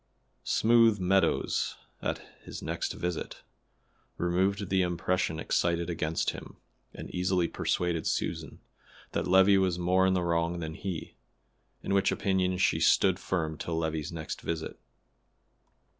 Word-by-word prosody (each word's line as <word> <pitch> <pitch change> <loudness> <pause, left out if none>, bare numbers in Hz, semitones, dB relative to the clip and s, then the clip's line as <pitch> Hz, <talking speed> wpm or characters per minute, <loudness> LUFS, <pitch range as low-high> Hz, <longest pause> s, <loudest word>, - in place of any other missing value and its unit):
Smooth 115 -1 +4
Meadows, 95 +1 +1 0.2
at - - -3 0.2
his - - -8
next - - -2
visit, 90 -1 -4 0.7
removed 95 +3 0
the 95 -1 +3
impression 90 -1 0
excited 85 +1 0
against 80 -1 -1
him, - - -10 0.3
and - - -9
easily 90 -1 +1
persuaded 85 -2 -1
Susan - - -3 0.5
that - - -1
Levi 95 +2 +6
was 95 -2 +1
more 90 +2 +3
in 95 - +2
the 90 - +1
wrong 85 0 0
than 80 -2 -5
he, 90 0 -5 0.7
in - - -1
which 100 -1 +3
opinion 95 -1 0
she 90 - +2
stood 95 -1 +4
firm 80 -4 -2
till 85 -1 -3
Levi's 80 -1 -2
next 80 -2 -6
visit. 80 -1 -4
90 Hz, 130 wpm, -29 LUFS, 85-95 Hz, 0.7 s, Levi